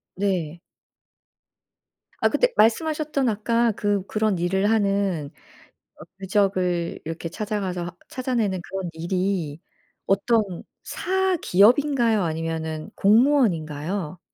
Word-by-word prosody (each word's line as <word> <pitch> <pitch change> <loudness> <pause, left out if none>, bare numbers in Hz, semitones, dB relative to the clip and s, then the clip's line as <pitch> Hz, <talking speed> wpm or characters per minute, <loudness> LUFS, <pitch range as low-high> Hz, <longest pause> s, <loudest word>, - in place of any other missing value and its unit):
네. 175 -4 -1 1.6
아 - - +4
근데 - - +1
말씀하셨던 295 +3 +2
아까 230 +2 +1
그 205 -2 -1
그런 215 -3 0
일을 190 +4 +1
하는 195 -8 0 0.7
어 - - -9 0.2
유적을 185 -3 0
이렇게 165 +1 -5
찾아가서 185 -3 -4
찾아내는 235 -8 -1
그런 190 -2 -5
일이 175 -2 -2 0.4
어떤 200 -1 +1 0.2
사기업인가요 275 - +2
아니면은 160 -1 -3
공무원인가요? 185 - +2
195 Hz, 230 characters per minute, -24 LUFS, 175-225 Hz, 1.6 s, 아